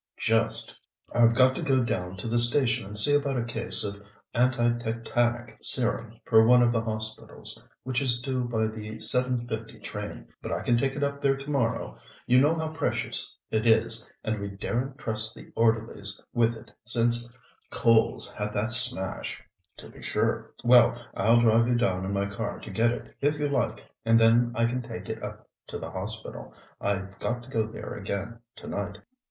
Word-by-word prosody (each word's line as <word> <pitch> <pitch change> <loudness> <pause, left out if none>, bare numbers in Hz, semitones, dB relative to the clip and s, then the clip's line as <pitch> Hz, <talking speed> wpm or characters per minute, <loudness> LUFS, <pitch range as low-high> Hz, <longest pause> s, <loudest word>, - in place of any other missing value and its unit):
"Just. 115 0 0 0.4
I've 115 -1 +3
got 130 +1 +4
to - - -6
go 130 -2 +1
down 90 -5 -4
to 95 - -6
the 120 +1 +2
station 120 -2 +3
and 105 +1 -5
see 145 +8 +7
about 140 -2 0
a 120 - -1
case 120 - +2
of 100 0 -5 0.3
anti 120 -1 +1
tetanic 120 +1 -3
serum 115 -2 0
for 110 -1 +5
one 125 +2 +5
of 120 - +2
the 115 -1 0
hospitals, 110 -1 -3 0.2
which 130 +1 -2
is 120 -3 +5
due 130 0 -3
by 110 -2 -1
the 110 0 -7
7.50 120 -3 +2
train, 105 0 -8
but - - -7
I - - -3
can 120 - +1
take 135 +3 -1
it 145 - -3
up 140 0 -3
there 135 -1 +1
to 135 +2 -7
morrow. 120 -5 -2 0.3
You 125 +1 +4
know 150 +4 +2
how 160 -1 -3
precious 160 - -2
it 110 +1 -1
is, 110 0 +2
and 110 -2 -3
we 100 - -5
daren't 125 +7 -4
trust 110 -4 -1
the - - -14
orderlies 110 -3 0
with 115 -1 +1
it 110 - -14
since 120 0 +1 0.4
Coles 115 -1 +2
had 105 0 -5
that 110 +3 -2
smash." 105 -6 +7 0.3
"To - - -10
be - - -16
sure. - - -2
Well, 120 0 +5 0.2
I'll 115 +4 +3
drive 115 0 +3
you 120 - +1
down 95 -6 -1
in 95 - -4
my 100 0 -1
car 100 +2 -5
to - - -9
get 115 +4 +1
it, 120 - -7
if 145 +1 0
you 145 0 -2
like, 140 - -3 0.2
and 115 0 +3
then 115 +1 +3
I 115 - +1
can 125 +2 -2
take 120 - -9
it - - -6
up - - -9 0.2
to - - -6
the - - -8
Hospital. 110 +4 -7 0.2
I've 95 -1 -4
got 120 0 -4
to 125 - -16
go 110 -4 -1
there 110 - -9
again 100 +3 -6 0.2
tonight." 100 0 -6
115 Hz, 190 wpm, -26 LUFS, 110-125 Hz, 0.4 s, see